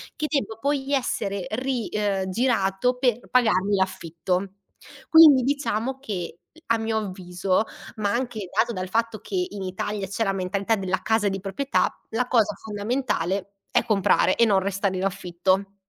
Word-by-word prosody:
che 305 - -2
debba 275 -7 -1
poi 280 +1 -1
essere 200 -8 -1
ri 250 0 -2
ehm, 200 -3 -1
girato 230 +1 +1
per 245 -2 0
pagarmi 205 -5 +3
l'affitto. 185 0 -2 0.6
Quindi 310 -5 +8
diciamo 265 -2 -1
che, 185 -9 -5 0.3
a 230 - +3
mio 225 0 -1
avviso, 185 -1 -1 0.3
ma 205 -2 0
anche 235 -6 -3
dato 235 +1 +2
dal 185 -2 -4
fatto 225 +1 0
che 360 - -2
in 200 - -6
Italia 195 +2 -3
c'è 200 +4 -1
la 195 -3 0
mentalità 195 +3 0
della 190 -2 -2
casa 220 -2 +2
di 195 0 -3
proprietà, 200 +9 0 0.2
la 245 +2 -1
cosa 220 -4 +3
fondamentale 205 -3 -2 0.2
è - - +2
comprare 195 -3 +3
e 235 - +4
non 200 -3 +4
restare 195 0 -1
in 185 - -1
affitto. 190 +1 -1
205 Hz, 155 wpm, -24 LUFS, 190-240 Hz, 0.6 s, Quindi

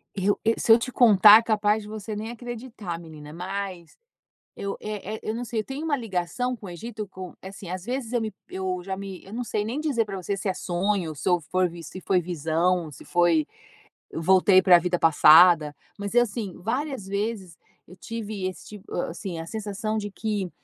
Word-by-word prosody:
Eu, 200 +1 +1
e 225 - +2
se 225 - +2
eu 225 - +10
te 245 +2 -4
contar 215 -3 +8
é - - -3
capaz 215 -1 +1
de 210 - -11
você 215 0 -6
nem 215 +2 -5
acreditar 235 -7 -7
menina, 155 -2 -11
mas 185 -1 -6 0.6
eu, 200 0 -4
eh 215 0 -5
eh, - - -13
eu 215 - -2
não 240 +2 -4
sei, 230 -1 -4
eu - - -5
tenho 275 +4 -6
uma 300 -3 +1
ligação 225 +3 -2
com 215 - -11
o - - -7
Egito 215 +4 -6
com, 185 -2 -9
assim, 190 0 -9
às 185 0 -5
vezes, 245 0 -4
eu 240 - +1
me 220 -1 -3 0.2
eu 185 -1 -3
já 190 0 -4
me, 195 -2 -8
eu 195 - -13
não 245 - -2
sei 210 -2 -2
nem 240 +7 -3
dizer 280 -7 +1
pra 200 -2 -6
você 195 +2 -3
se 195 - -3
é 190 - 0
sonho, 180 -2 -1
se 145 - -3
eu 175 -1 +3
for 180 +4 0
vi 170 0 -10
se 185 +4 -9
foi 185 -1 +2
visão, 170 0 0
se - - -12
foi, 170 -3 +3 0.7
eu 160 - -5
voltei 185 +2 +5
pra 180 -2 +7
vida 175 +1 -1
passada, 160 -1 +6 0.2
mas 200 +1 -5
é 240 - +7
assim, 215 -5 -2
várias 255 - -3
vezes 200 -3 -3 0.3
eu 180 - -13
tive 215 0 -5
esse 185 - -9
tipo, 210 -2 -12
assim, 175 0 -4
a 165 - -6
sensação 215 +2 -3
de 205 -1 -4
que, 205 -3 -3
195 Hz, 215 wpm, -25 LUFS, 180-220 Hz, 0.7 s, eu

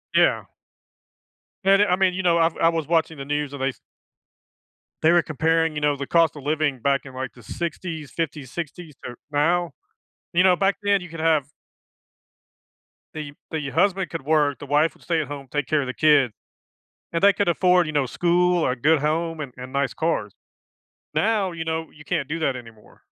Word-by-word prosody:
Yeah. - - +3 1.2
And 195 +1 +5
it 205 - +4
I 180 - +4
mean, 185 -1 +2
you 190 +1 -3
know, 170 -2 +3
I 165 0 +4
I 165 - +5
was 165 -2 -2
watching 160 -1 +1
the 135 - -6
news, 145 0 -2
and 140 - -7
they 135 - +1
s 130 - -10 1.2
they 160 - +5
were 175 0 +5
comparing, 160 +1 +1
you 150 - -3
know, 145 -1 +2
the 140 -1 -6
cost 165 -2 +3
of 145 - -10
living 150 -2 0
back 140 +2 +1
in, 135 - -10
like, 130 0 -5
the 120 - -16
‘60s, 160 - -5
‘50s, 150 -5 -4
‘60s 165 0 -7
to 125 - -7 0.2
now. 170 +4 +1 0.6
You 175 +1 +4
know, 185 -1 +5
back 195 +2 +1
then, 200 -1 +3
you 180 - -9
could 165 0 -8
have 155 -3 +2 1.7
The 150 -2 -6 0.2
the 150 -3 -3
husband 190 +5 +1
could 165 - -4
work, 145 -1 +2
the - - -8
wife 150 +3 +2
would - - -22
stay 165 -2 0
at 150 - -5
home, 140 -1 -7
take 145 +1 -2
care 155 -1 +2
of 135 - -4
the 130 - -3
kid, 145 -5 +4 0.8
and 165 - -1
they 200 0 +7
could 200 0 0
afford, 180 0 +3
you 155 - -4
know, 145 -2 +2
school 175 +5 +2
or - - +2
a - - -2
good 150 +5 +3
home 160 +2 -1
and 140 -4 -6
and 125 +1 -8
nice 140 0 0
cars. 160 - -1 0.8
Now, 210 -3 +1
you 165 -1 -4
know, 160 0 -3
you 150 - -15
can't 150 -4 -2
do 165 +3 -3
that 140 -5 0
anymore. 115 -3 -13
160 Hz, 205 wpm, -23 LUFS, 140-170 Hz, 1.7 s, they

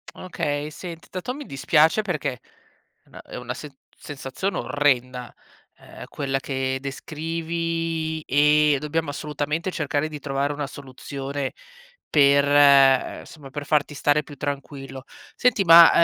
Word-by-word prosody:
Okay. 150 -5 -3
Senti, 165 +1 -9
tanto 185 +7 -4
mi 290 +2 -7
dispiace, 155 +8 +3
perché 165 -8 -2 0.7
è - - -28
na - - -12
è - - -11
una 125 0 -5
sen 145 -3 -10 0.2
sensazione 145 +7 -4
orrenda, 125 -4 0 0.4
ehm, - - -12
quella 135 -1 -2
che 130 -1 -2
descrivi, 165 +2 -3
e 150 +1 +4
dobbiamo 150 +1 -2
assolutamente 150 +4 -3
cercare 150 -1 -1
di 150 - -7
trovare 140 +1 -1
una 145 -1 -4
soluzione 140 0 -6 0.6
per, 140 -1 +5
uhm, 140 -2 +5
somma 140 -4 -13
per 145 0 -6
farti 150 -1 +1
stare 145 +1 +2
più 145 - -11
tranquillo. 135 -1 -6 0.3
Senti 250 -5 +3
ma, 170 -1 +10
145 Hz, 130 wpm, -24 LUFS, 135-160 Hz, 0.7 s, ma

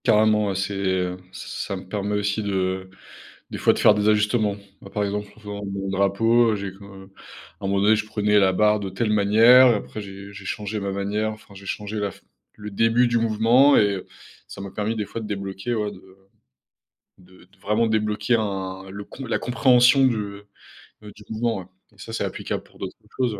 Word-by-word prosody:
Carrément, 105 -2 +4
ouais. 95 - -2
C'est, 100 +2 -2
heu, 95 -2 -1
s 90 - -9 0.2
ça 100 - -3
me 95 0 -9
permet 105 +1 -2
aussi 105 +1 -1
de 95 -2 -2 0.6
des - - -5
fois - - +4
de - - -3
faire - - +6
des 105 0 +1
ajustements. 105 0 +2 0.3
Bah, 100 - -11
par 105 - 0
exemple, 105 +1 -3
en - - -17
faisant 105 -1 -7
mon 100 0 -4
drapeau, 110 +5 +3
heu, - - 0
j'ai 100 -1 -5
comme, 95 0 -13
heu, 95 - -19 0.5
à - - -10
un - - 0
moment 100 0 +1
donné, 105 +2 +5
je 105 - -1
prenais 105 -1 +1
la 95 -1 +4
barre 105 +2 +3
de 100 -2 -4
telle 105 +3 -1
manière. 110 +5 +7
Après, 110 -1 -1
j'ai 100 0 -10
j'ai 100 0 -11
changé 105 +2 -4
ma 100 0 -3
manière, 100 +2 -1
enfin, 110 -2 -12
j'ai 100 0 -12
changé 105 +1 -4
la 100 -1 -1
f - - -17 0.3
le 105 0 -8
début 115 +4 +3
du 120 0 +1
mouvement, 115 +5 +4
et - - +6
heu, 95 - -7 0.4
ça - - -10
m'a 100 -1 -7
permis, 110 +2 -2
des 105 - -2
fois, 115 - -6
de 110 - -6
débloquer, 100 +2 -4
ouais, 105 -1 -2
de - - -13 1.2
de 90 0 -19
de 95 +3 -28
vraiment 105 +3 +1
débloquer 110 +2 0
un 95 -3 -4
le 100 +1 -7
con 135 +5 -9
la 115 - 0
compréhension 125 +2 +4
du, 125 -3 +3
heu, 100 -1 -6 0.5
heu, 105 -1 -11
du 105 - -14
mouvement, 115 0 -1
ouais, - - -12 0.3
et - - -26
ça, 110 +3 -9
c'est - - -2
applicable - - -4
pour - - -22
d'autres - - -6 0.2
choses. 120 -5 0
105 Hz, 220 wpm, -23 LUFS, 100-110 Hz, 1.2 s, manière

